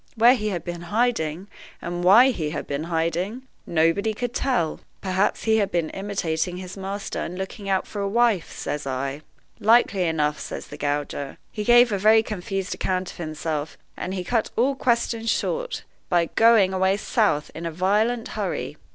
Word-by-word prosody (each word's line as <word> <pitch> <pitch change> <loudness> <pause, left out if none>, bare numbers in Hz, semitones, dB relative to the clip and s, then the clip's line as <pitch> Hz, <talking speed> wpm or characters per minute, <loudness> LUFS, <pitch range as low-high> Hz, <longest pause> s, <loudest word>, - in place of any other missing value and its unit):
Where 235 +2 +7
he 215 -4 -1
had 180 -4 -3
been 175 -1 -5
hiding, 200 -6 0 0.3
and 175 0 -4
why 230 +9 +7
he 160 -10 -3
had 150 - -4
been 145 +2 -3
hiding, 170 +8 -1 0.2
nobody 170 +7 +2
could 245 +1 -3
tell.' 210 - 0 0.2
'Perhaps 190 +1 0
he 220 -1 +3
had 205 -3 +1
been 170 -3 -1
imitating 180 -3 -2
his 185 0 -7
master, 195 +1 -4
and 180 - -4
looking 195 +1 -5
out 190 -1 +1
for 205 - -5
a 200 - -1
wife,' 230 -4 +2
says 150 -1 -4
I. 135 +2 -3 0.4
'Likely 210 -4 +4
enough,' 150 -2 0
says - - -7
the - - -8
gauger; 145 -1 -3
'he 210 - -4
gave 240 +1 +6
a 200 - 0
very 220 +2 +5
confused 195 -2 -3
account 185 -1 -2
of - - -15
himself, 155 -2 -4 0.2
and 185 - -4
he 185 - -3
cut 225 +3 0
all 260 +4 +2
questions 235 -3 0
short - - -1 0.3
by 170 -2 +2
going 220 -4 +5
away 190 +1 +2
south 210 - +1
in 170 +1 -5
a - - -3
violent 210 +7 +1
hurry. - - -3
190 Hz, 175 wpm, -24 LUFS, 165-220 Hz, 0.4 s, Where